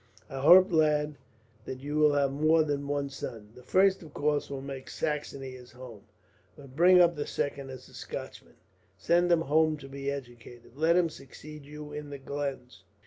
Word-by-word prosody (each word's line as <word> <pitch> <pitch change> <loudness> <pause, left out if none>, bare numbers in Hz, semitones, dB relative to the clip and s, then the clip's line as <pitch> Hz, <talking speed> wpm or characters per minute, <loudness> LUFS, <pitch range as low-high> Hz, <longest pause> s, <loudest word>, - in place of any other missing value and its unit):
"I 135 - -5
hope, 180 +7 +7
lad, 150 -2 +2 0.5
that 130 - -6
you 145 +2 -3
will 150 -1 +5
have 140 -1 +2
more 155 +3 +3
than 145 -2 -3
one 145 0 -1
son. 110 -5 -7
The 125 - -14
first, 190 +8 +3
of 155 -4 -13
course, 150 0 0
will 140 -1 -5
make 135 -1 -7
Saxony 145 -3 -4
his 125 -1 -13
home; 125 -5 -11 0.5
but 135 -2 -14
bring 180 +3 +6
up 175 -1 +5
the 145 -1 -4
second 140 -1 -3
as 130 -1 -10
a - - -19
Scotchman, - - -8 0.4
send 175 +1 +2
him 170 -1 +4
home 155 +1 +2
to 135 -2 -11
be 140 0 -5
educated, 120 -3 -9
and 130 - -22
let 165 +1 +4
him 175 -2 +3
succeed 150 0 -12
you 150 0 -9
in 150 0 -7
the 140 - -7
glens. 135 -2 -6
145 Hz, 195 wpm, -29 LUFS, 135-155 Hz, 0.5 s, hope